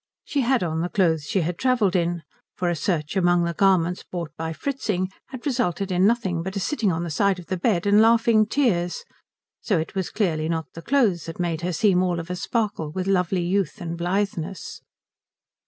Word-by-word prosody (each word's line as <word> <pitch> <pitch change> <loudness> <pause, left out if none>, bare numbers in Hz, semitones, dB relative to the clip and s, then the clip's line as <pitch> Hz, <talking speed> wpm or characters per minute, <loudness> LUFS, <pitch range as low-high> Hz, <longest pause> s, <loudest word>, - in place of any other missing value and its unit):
She 285 - -1
had 255 -3 +2
on 160 -1 -1
the 175 - -2
clothes 165 -7 +1
she 190 +6 0
had 170 +1 -3
travelled 240 -8 +2
in, 170 -1 0 0.3
for 175 -1 0
a - - -1
search 155 0 -2
among 175 -2 +3
the 170 0 -1
garments 180 -1 +2
bought 170 -4 -6
by 160 0 -4
Fritzing 190 - -2 0.2
had 255 0 -9
resulted 200 - -1
in 185 +2 +4
nothing 200 -7 0
but 190 +3 -5
a - - -1
sitting 215 -2 0
on 165 0 -2
the 170 - -4
side 200 +4 +2
of 180 - -10
the 185 - -2
bed 180 -1 +1
and 205 +1 +5
laughing 225 -1 +4
tears, 195 -10 0 0.6
so 200 - +1
it 160 - -3
was 190 -2 -2
clearly 160 -7 0
not 160 -1 -1
the 165 - -8
clothes 215 - +2
that 165 - -7
made 170 -2 -1
her 180 +1 -1
seem 180 +1 +3
all 180 -2 0
of 170 +2 -6
a - - -2
sparkle 200 -5 -2
with 185 +3 -3
lovely 185 -2 +1
youth 190 +2 -1
and 170 -2 -4
blitheness. 180 -1 -3
180 Hz, 205 wpm, -24 LUFS, 170-205 Hz, 0.6 s, and